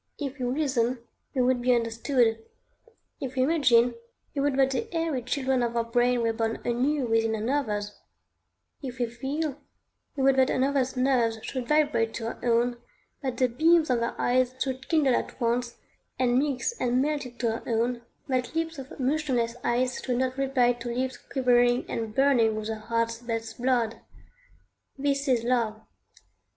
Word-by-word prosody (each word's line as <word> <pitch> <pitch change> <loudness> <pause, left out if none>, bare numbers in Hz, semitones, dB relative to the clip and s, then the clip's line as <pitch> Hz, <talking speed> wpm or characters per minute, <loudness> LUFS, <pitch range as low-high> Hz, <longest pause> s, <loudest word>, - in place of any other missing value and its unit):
If 280 -1 -5
we 250 - -1
reason, 255 -3 0 0.4
we 255 - +3
would 250 0 +2
be 250 0 +4
understood; 230 0 +1 0.8
if 260 -1 -5
we 255 - +2
imagine, 250 -6 +4 0.4
we 280 - -1
would 280 -1 +1
that 270 -1 +4
the 445 +11 -3
airy 325 -6 -1
children 260 +1 0
of 235 -1 -1
our 230 - +2
brain 240 +1 +1
were 230 0 +1
born 225 0 -1
anew 260 +4 +1
within 225 -1 +1
another's; 215 -3 -2 0.8
if 260 -3 -6
we 245 - +1
feel, 270 +5 -4 0.5
we 270 - -1
would 270 0 +4
that 260 0 +4
another's 265 -1 +1
nerves 250 -3 +2
should 255 -3 -4
vibrate 295 -7 +2
to 225 - -4
our 230 - -5
own, 240 0 +2 0.4
that 260 -4 -3
the 255 - +3
beams 315 +4 +3
of 245 - +2
their 235 0 -3
eyes 255 +1 +2
should 265 -1 -3
kindle 300 -6 +3
at - - -3
once 240 0 0 0.4
and 250 -1 +3
mix 280 - 0
and 250 0 +2
melt 290 -1 0
into 240 -1 -2
our 225 - -6
own, 235 +1 0 0.3
that 255 +2 -1
lips 325 -2 -2
of 270 +1 -10
motionless 260 -4 0
ice 250 +1 0
should 250 -2 -1
not 260 0 0
reply 265 -3 +2
to 240 0 -7
lips 255 +2 -2 0.2
quivering 245 -2 +3
and 220 -2 -4
burning 250 -5 +4
with 215 0 -4
the 220 -1 -3
heart's 230 +1 -1
best 225 -1 -5
blood. 240 -3 +1 1.0
This 280 +1 0
is 245 -3 +2
Love. 235 -3 0
250 Hz, 170 wpm, -27 LUFS, 235-270 Hz, 1.0 s, be